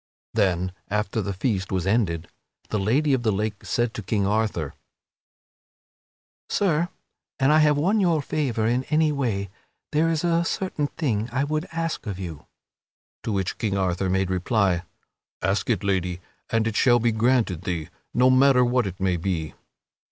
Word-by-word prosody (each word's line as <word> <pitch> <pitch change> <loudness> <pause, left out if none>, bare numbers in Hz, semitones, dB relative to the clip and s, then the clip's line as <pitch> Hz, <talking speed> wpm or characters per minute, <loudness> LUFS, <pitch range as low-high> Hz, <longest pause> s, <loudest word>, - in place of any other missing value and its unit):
Then, 95 -4 +1 0.2
after 105 +1 -1
the 100 - -3
feast 95 -1 -1
was 95 -2 0
ended, 95 -6 +1 0.4
the 110 - 0
Lady 135 +9 +2
of 130 - +2
the 110 -2 +2
Lake 105 +1 -2
said 120 -1 0
to - - -5
King 100 0 0
Arthur, 110 +2 0 1.8
"Sir, 175 -3 +1 0.5
an 135 +1 +4
I 155 - +6
have 150 -1 +4
won 190 +9 +2
your 170 -5 +3
favor 130 -7 -1
in 120 +3 +1
any 155 0 +2
way, 110 -9 -2 0.4
there 160 +2 +2
is 160 -1 0
a 170 -1 +2
certain 170 -4 -1
thing 120 -8 -2
I 135 +3 +1
would 155 +3 -2
ask 165 -6 -3
of 100 -3 -3
you." 85 -6 -7 0.7
To - - -12
the - - 0
which 95 -2 -2
King 100 -3 0
Arthur 95 0 0
made 95 0 +1
reply: 95 -1 +1 0.6
"Ask 95 +5 0
it, 110 -3 +1
Lady, 90 -3 0 0.3
and 115 -1 +1
it 110 -1 -1
shall 120 +1 +5
be 120 0 +2
granted 110 -5 +1
thee, 85 -4 -3 0.2
no 125 +1 +4
matter 130 -1 +5
what 120 -3 +1
it 95 -1 -7
may 95 -2 +1
be." 85 -3 -2
110 Hz, 170 wpm, -24 LUFS, 95-140 Hz, 1.8 s, I